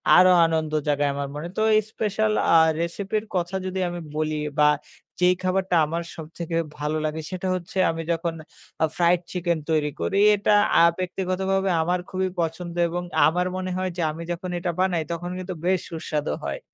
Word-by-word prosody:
আরো 185 +1 +7 0.2
আনন্দ 160 -1 0 0.2
জায়গায় 145 0 +2
আমার 140 0 -3
মনে। 150 +3 -4
তো - - +1
এই 215 - +5
special 215 0 0 0.2
আ - - +6 0.2
recipe 170 +4 -4
এর 215 - -12
কথা 175 +1 -1
যদি 190 0 -3
আমি 175 0 -5 0.2
বলি 155 0 -1 0.2
বা 150 - +6 0.5
যেই 180 0 +4
খাবারটা 185 0 +1
আমার 165 +2 -3
সবথেকে 165 +1 -6 0.2
ভালো 150 +1 -1
লাগে 155 +1 -2
সেটা 185 0 -3
হচ্ছে 180 +1 -7
আমি 165 0 -4
যখন 165 0 -1 0.5
আ - - +7
fried 175 0 +3
chicken 175 -2 0
তৈরি 155 -2 +2
করি। 195 - 0 0.2
এটা 205 - +1 0.3
আ - - +7 0.2
ব্যক্তিগতভাবে 190 +1 -1
আমার 175 +2 0
খুবই 185 0 -1
পছন্দ 170 +1 -2 0.2
এবং 175 +1 -3 0.2
আমার 180 +3 +1
মনে 185 0 -3
হয় 185 0 -1
যে, - - -1
আমি 165 +2 -7
যখন 180 +1 -4
এটা 175 0 -1
বানাই 185 -3 +2
তখন 170 +1 -4
কিন্তু 185 0 -5
বেশ 185 0 +3
সুস্বাদু 155 -2 -2
হয়। - - -3
175 Hz, 185 wpm, -24 LUFS, 160-185 Hz, 0.5 s, আরো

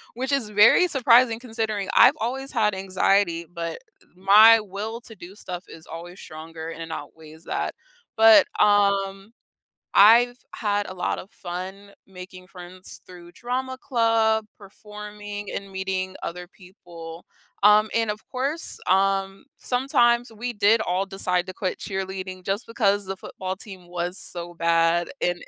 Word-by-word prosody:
Which 260 +3 -3
is 275 -6 0
very 210 - +5
surprising 240 -5 +4
considering 220 -4 -3
I've - - +7
always 265 +5 -3
had 215 -4 +1
anxiety, 190 -2 +1
but 170 -1 -5 0.4
my 210 +5 +7
will 215 +3 -6
to 225 -2 -13
do 185 0 -12
stuff 180 -3 -7
is 160 - -13
always 175 +3 -9
stronger 160 0 -9
and 165 0 -8
outweighs 160 +1 -10
that. - - -3 0.4
But, 225 0 +7
um, 200 -1 +2 0.6
I've 240 +4 +6 0.2
had 205 -2 -1
a - - -7
lot 180 -1 -2
of 190 - -11
fun 190 +3 -8 0.2
making 185 -1 -12
friends 185 0 -11
through 175 -1 -14
drama 260 +2 -4
club, 225 -4 +1
performing, 205 0 -9
and 200 0 -6
meeting 190 0 -4
other 180 +1 -6
people. 175 -3 -13 0.4
Um, 210 +1 +5
and 225 -1 0
of 210 +1 -5
course, 275 +6 -3
um, 195 0 +1
sometimes 245 -2 +1
we 240 +3 -5
did 210 +1 +3
all 190 -2 -1
decide 180 -2 -1
to 185 - -7
quit 185 0 -3
cheerleading 190 -1 -6
just 200 +4 -2
because 205 -3 +1
the 195 0 -5
football 185 0 -6
team 190 -3 -11
was 175 +1 -3
so 175 -2 -5
bad 170 0 +1
and 175 0 -1
195 Hz, 145 wpm, -24 LUFS, 180-220 Hz, 0.6 s, I've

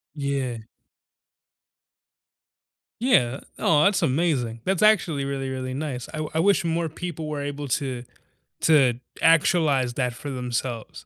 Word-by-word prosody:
Yeah. 135 -5 -2 2.4
Yeah. 135 - +2 0.2
Aw, 150 -1 +3
that's 200 -2 +3
amazing. 130 -7 0
That's 190 0 0
actually 175 -10 +3
really, 135 -1 -3
really 130 -1 -4
nice. 135 -4 -4
I 155 0 -2
I - - +1
wish 195 +2 +3
more 165 0 0
people 160 0 -6
were 150 -2 -3
able 145 0 -5
to 125 -1 -2 0.6
to 135 -6 +4 0.2
actualize 155 -6 +3
that 125 -2 -1
for 145 +4 -7
themselves. 125 -2 -4
140 Hz, 125 wpm, -24 LUFS, 125-160 Hz, 2.4 s, to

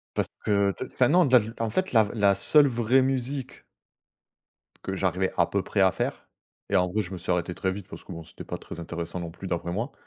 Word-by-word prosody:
Parce - - 0 0.2
que 100 -2 +3
te 130 - -6
enfin 125 -1 +1
non 180 +3 +5
de 130 -2 +6
la 115 - +2
l 110 +2 -7
en 115 -1 0
fait 185 0 -1
la 110 -3 +6
v 100 - -5
la 100 -3 +3
seule 150 -2 +5
vraie 120 +1 +2
musique 130 0 -2 1.2
que 95 - -3
j'arrivais 95 0 0
à 85 - +4
peu 100 -1 -1
près 100 - -2
à 95 - +5
faire - - -3 0.4
et 100 - 0
en 90 0 +3
gros 105 +4 -1
je 95 -2 -8
me 95 - -5
suis 90 +1 -3
arrêté 90 0 0
très 95 - -1
vite, 95 -1 -7
parce - - -10
que - - -11
bon 85 -1 -8
c'était - - -11
pas - - -5
très - - -9
intéressant 85 +1 -5
non 85 -1 -6
plus 95 +2 -9
d'après 85 0 -2
moi 115 +9 -3
100 Hz, 255 wpm, -26 LUFS, 90-120 Hz, 1.2 s, de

